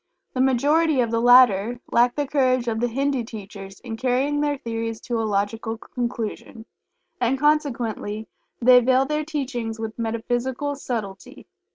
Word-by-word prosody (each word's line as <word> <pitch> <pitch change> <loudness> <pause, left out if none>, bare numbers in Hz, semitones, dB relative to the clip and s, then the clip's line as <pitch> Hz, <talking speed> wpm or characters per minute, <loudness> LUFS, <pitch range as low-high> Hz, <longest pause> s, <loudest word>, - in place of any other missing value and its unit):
The 255 - 0
majority 285 +4 +3
of 235 -2 -1
the 230 0 +1
latter 245 -2 +5
lack 240 +1 +3
the 290 - -1
courage 255 -3 +1
of 220 -1 -1
the 245 - +1
Hindu 270 +1 -1
teachers 200 -3 -10
in 225 -3 -6
carrying 265 +4 0
their 290 -1 0
theories 225 -2 -4
to 240 -2 -2
a 220 - -2
logical 220 +3 -2
conclusion, 235 -2 -5 0.5
and, 250 +2 +1
consequently 240 -8 -1 0.3
they 250 +1 +7
veil 255 +2 +3
their 300 +2 -1
teachings 255 -7 -4
with 225 +1 -6
metaphysical 240 +5 -2
subtlety. 220 -8 -6
245 Hz, 150 wpm, -23 LUFS, 225-265 Hz, 0.5 s, they